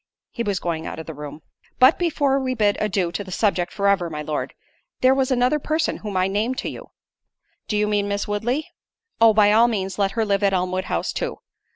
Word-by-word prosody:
He 235 - -5
was 205 -4 -1
going 165 -2 -3
out - - -6
of 160 - -7
the 160 - -7
room. 150 +1 -9 0.3
"But 260 +4 +6
before 290 -6 +1
we 255 -1 -2
bid 210 -3 +2
adieu 190 -4 0
to 205 - -4
the 190 - -11
subject 180 -3 0
for 200 -1 -1
ever, 195 -4 +2
my 150 -1 -5
Lord—there 155 - -2
was 265 -1 +1
another 255 +3 +2
person 315 +2 -1
whom 205 -3 -5
I 185 0 +2
named 215 +6 -1
to - - -3
you—" - - -10 0.8
"Do 210 - -1
you 210 - +2
mean 205 -1 0
Miss 200 0 -2
Woodley? 240 +8 -1 0.5
Oh, 225 -1 +8
by 210 -1 +5
all 225 +3 +5
means 195 -4 -3
let 195 -1 +1
her 225 -1 0
live 200 -1 +1
at 200 -1 +2
Elmwood 185 0 -1
House - - -2
too. 485 -1 -3
205 Hz, 220 wpm, -22 LUFS, 185-245 Hz, 0.8 s, Oh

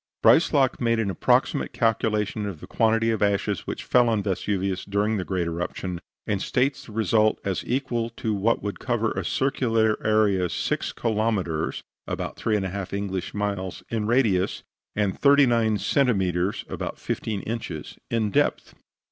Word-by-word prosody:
Breislak 145 -5 +4
made 115 -1 +2
an 105 -3 0
approximate 90 - +1
calculation 110 -2 0
of 95 -6 -6
the - - -9
quantity 115 0 +2
of 110 - -2
ashes 100 -2 0
which - - -4
fell 125 -1 +4
on 110 -3 +1
Vesuvius 95 -1 -1
during 105 +2 0
this 90 - -4
great 90 -3 0
eruption, 85 +1 -4 0.3
and 100 -3 -1
states 135 +2 0
the - - -11
result 110 0 +2
as 95 -2 -1
equal 120 -3 -1
to 110 -1 -3
what 105 +3 +1
would 100 -1 -4
cover 115 -3 0
a - - -3
circular 115 -5 +1
area 105 -4 +2
6 - - -2
kilometres 105 -8 -1 0.2
(about - - -4
3 110 -2 0
1/2 95 0 -4
English 100 -2 -3
miles) 100 -3 -3
in 110 -2 -1
radius, 110 -7 +2 0.3
and 100 -3 0
39 120 -6 +4
centimetres 95 - +1
(about - - -5
15 105 -3 -3
inches) 105 -9 -5
in 110 -3 0
depth. - - +1
105 Hz, 150 wpm, -25 LUFS, 95-115 Hz, 0.3 s, Breislak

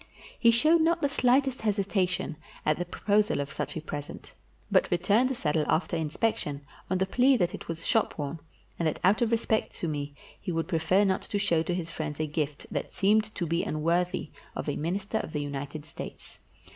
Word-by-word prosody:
He 235 - +6
showed 310 +9 +5
not 335 0 +2
the 285 - +3
slightest 260 0 +2
hesitation 195 -5 0 0.3
at 155 +1 +2
the 175 - -1
proposal 205 +2 +1
of 140 -1 -3
such 150 +1 -4
a - - -3
present, 145 -2 -7 0.4
but - - +4
returned 205 +8 +3
the 265 - -1
saddle 155 -6 +1
after 170 +1 +1
inspection, 160 -1 -1 0.3
on 185 - +2
the 190 - +2
plea 255 +6 +4
that 175 -5 +1
it - - -7
was 165 0 -4
shopworn, 150 +2 0 0.4
and 165 - +2
that 155 - -1
out 195 +5 +4
of 235 - +3
respect 225 -1 0
to 170 - -3
me 145 -2 -3 0.2
he - - -4
would 165 -1 -1
prefer 180 +3 +3
not 190 -2 +1
to 205 - -3
show 185 -6 +2
to 175 +2 -1
his 165 -2 -4
friends 155 -3 -4
a 155 - +1
gift 150 -1 -3
that - - -3
seemed 215 +2 +3
to 175 - -1
be 170 +1 +1
unworthy 170 +3 0 0.2
of - - -4
a 145 - 0
Minister 195 +7 -1
of 155 - -6
the 150 - -1
United 145 +1 -5
States. - - -9
175 Hz, 200 wpm, -28 LUFS, 155-215 Hz, 0.4 s, He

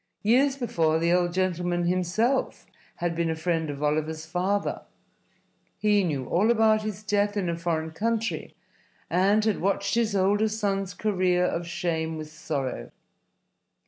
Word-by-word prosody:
Years 265 +6 +3
before 165 - +1
the 170 +1 +2
old 175 -1 +2
gentleman 175 -1 0
himself 185 +9 0 0.3
had 175 -1 -2
been 170 0 0
a 160 - -1
friend 160 -1 -1
of 145 0 -5
Oliver's 155 +1 -1
father. 185 +5 -1 1.0
He 210 -1 +3
knew 145 -7 -2
all 200 - +2
about 220 -2 +4
his 210 -1 -5
death 205 0 0
in 190 -3 0
a 170 - -1
foreign 165 -1 -2
country, 225 +6 -2 0.6
and 200 +5 +3
had 215 -3 0
watched 200 +1 0
his 230 -3 +1
older 200 +3 +3
son's 200 -3 -2
career 185 -4 +1
of 170 -1 -2
shame 165 -2 -2
with 155 0 -7
sorrow. 150 -4 -4
180 Hz, 145 wpm, -26 LUFS, 165-210 Hz, 1.0 s, about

